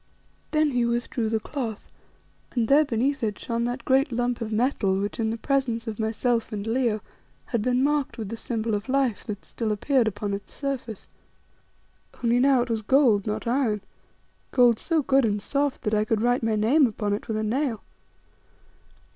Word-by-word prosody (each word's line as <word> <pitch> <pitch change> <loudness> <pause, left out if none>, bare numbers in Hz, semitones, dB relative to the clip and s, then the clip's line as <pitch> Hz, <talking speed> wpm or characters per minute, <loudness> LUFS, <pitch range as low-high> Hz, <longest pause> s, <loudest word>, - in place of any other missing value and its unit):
Then 305 -1 +2
he 245 -2 +1
withdrew 235 -1 -1
the 220 0 +1
cloth, 230 -3 -5 0.7
and 235 -3 +1
there 285 +4 +6
beneath 270 +2 0
it 215 -3 -1
shone 235 0 -2
that 245 0 -4
great 270 +1 +3
lump 245 0 -1
of 225 -1 -3
metal 215 -4 +1
which, 205 +3 -3
in 220 -1 +1
the 225 - -2
presence 240 -3 0
of 225 -2 -5
myself 230 +2 0
and 205 -1 -4
Leo, 225 -2 0 0.4
had 235 -4 -1
been 250 +3 +1
marked 290 -1 0
with 220 -4 -5
the 230 - -4
Symbol 225 -1 -3
of 205 +5 -3
Life, 260 -6 +1
that 205 -2 -6
still 225 -2 -3
appeared 240 +3 +2
upon 205 -1 -2
its 200 0 -7
surface. 260 -7 -4 1.2
Only 240 +1 +3
now 265 -1 +4
it 245 - -8
was 225 -1 0
gold, 225 -3 +3
not 215 +2 -2
iron, 235 -4 +1 0.7
gold 240 -3 +4
so 325 -3 0
good 270 0 +3
and 210 -2 +1
soft 280 +5 -1
that 215 -2 -1
I 210 0 +3
could 215 0 0
write 245 +1 +2
my 225 -1 +1
name 255 +7 +4
upon 210 -2 -2
it 205 - -4
with 220 - -2
a 215 - -1
nail. 235 +1 -1
235 Hz, 190 wpm, -25 LUFS, 215-260 Hz, 1.2 s, there